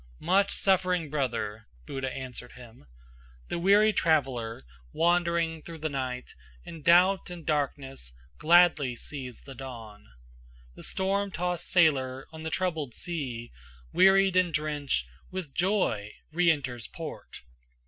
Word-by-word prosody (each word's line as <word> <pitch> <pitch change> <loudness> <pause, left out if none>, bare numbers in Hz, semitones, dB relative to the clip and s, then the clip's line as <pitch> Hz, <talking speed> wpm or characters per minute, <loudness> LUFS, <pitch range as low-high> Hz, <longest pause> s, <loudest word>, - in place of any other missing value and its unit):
"Much 195 +2 +2
suffering 180 -5 +1
brother," 110 -7 -2 0.2
Buddha 135 -1 -4
answered 125 -2 -7
him, 120 - -14 0.6
"The - - -2
weary 205 +4 +5
traveler, 130 - 0 0.3
wandering 170 -1 +1
through 165 +1 -9
the 155 0 -3
night 130 -2 -4 0.3
In 165 - -9
doubt 180 +5 +4
and 175 -3 -8
darkness, 135 - -2 0.3
gladly 160 -5 +5
sees 130 -1 -8
the 135 - -10
dawn. 115 -5 -10 0.7
The - - -13
storm 195 +1 0
tossed 180 -1 -1
sailor 135 -6 +2
on 160 - -8
the 160 - -3
troubled 160 -8 -2
sea, 130 -9 -5 0.4
Wearied 195 0 +5
and 185 -2 +3
drenched, 150 - -1 0.2
with 180 -7 -6
joy 175 - 0 0.2
re 175 +2 +3
enters 130 -7 -1
port. - - -9
155 Hz, 125 wpm, -28 LUFS, 130-175 Hz, 0.7 s, weary